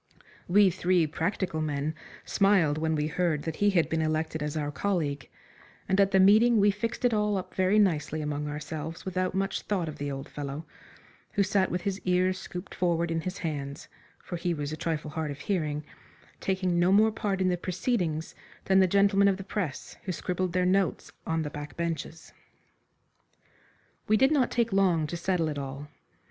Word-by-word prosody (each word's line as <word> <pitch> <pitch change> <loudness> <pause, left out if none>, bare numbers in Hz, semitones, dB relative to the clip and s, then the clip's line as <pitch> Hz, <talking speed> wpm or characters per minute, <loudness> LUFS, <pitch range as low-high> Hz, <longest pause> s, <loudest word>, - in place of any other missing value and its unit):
We 195 +1 +5
three 175 0 +2
practical 160 +1 -2
men 150 0 -1 0.3
smiled 185 -7 +3
when 160 0 0
we 150 -1 0
heard 155 -1 0
that 160 -1 -4
he 205 - +3
had 170 -6 +2
been 160 0 -1
elected 155 0 -1
as 150 +1 -2
our 145 -1 -2
colleague, 145 -4 -2 0.6
and 190 +1 +3
at 195 - +4
the 195 -1 +3
meeting 215 +4 +6
we 205 0 +5
fixed 230 +4 -3
it 245 - +3
all 210 -1 +1
up 185 -1 -6
very 190 +2 +2
nicely 160 -6 +2
among 150 0 -3
ourselves 155 +2 -6
without 185 0 -1
much 195 0 -1
thought 185 -5 -1
of 155 - -7
the 145 0 -2
old 135 0 -5
fellow 145 +2 -6 0.7
who 200 - +3
sat 195 -1 +1
with 180 - -2
his 195 0 -2
ears 185 +1 +1
scooped 180 +1 -8
forward 170 -2 0
in 165 0 0
his 185 +4 -4
hands, 140 -4 -5 0.3
for 175 - -6
he 170 0 -1
was 145 -1 -4
a - - -2
trifle 155 -1 -3
hard 160 -1 -3
of 145 0 -7
hearing, 155 -6 -1 0.6
taking 185 -2 0
no 175 +2 +4
more 215 +3 +5
part 205 -3 -2
in 185 -1 +2
the 180 - +2
proceedings 175 -3 -2 0.3
than 190 0 +4
the 190 - +5
gentlemen 200 +1 +4
of 195 -1 +2
the 195 - -7
press 190 -7 -4
who 190 - -1
scribbled 180 +1 -2
their 180 0 +2
notes 190 0 +1 0.2
on 160 0 0
the 150 - -5
back 145 -1 -8
benches. 165 -1 -4 1.7
We 215 - +4
did 265 +5 +4
not 275 -5 +3
take 230 -3 0
long 180 -5 +3
to 160 - -4
settle 170 -1 0
it 150 -2 -3
all. 140 +1 -6
175 Hz, 190 wpm, -28 LUFS, 155-195 Hz, 1.7 s, meeting